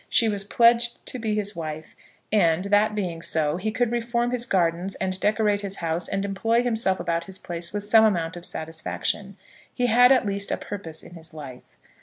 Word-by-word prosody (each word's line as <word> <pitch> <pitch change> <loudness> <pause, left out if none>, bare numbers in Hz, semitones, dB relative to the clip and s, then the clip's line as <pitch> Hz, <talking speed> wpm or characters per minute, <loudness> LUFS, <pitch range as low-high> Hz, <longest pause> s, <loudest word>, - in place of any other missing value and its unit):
She 230 - +4
was 205 -2 -1
pledged 235 +3 +3
to 255 - -4
be 220 -2 -1
his 205 0 0
wife; 155 -1 -6 0.4
and, 180 -4 +3
that 205 +1 +3
being 175 -5 -3
so, 155 -1 0
he 205 +4 -2
could 240 +1 0
reform 240 0 0
his 245 -1 -1
gardens 175 +1 0
and 185 0 -2
decorate 210 -1 +1
his 200 -1 -4
house, 165 -1 -2
and 195 0 -2
employ 225 +4 +1
himself 225 -5 +1
about 170 0 -1
his 190 -1 -8
place 170 -1 -4
with 205 0 -3
some 220 +2 +5
amount 175 -5 0
of 175 - -9
satisfaction. 165 +5 -4 0.3
He 245 - -1
had 245 +2 +6
at 260 -4 +4
least 200 0 -1
a - - 0
purpose 170 -6 -7
in - - -13
his 165 -1 -13
life. 135 -5 -11
200 Hz, 200 wpm, -25 LUFS, 170-225 Hz, 0.4 s, had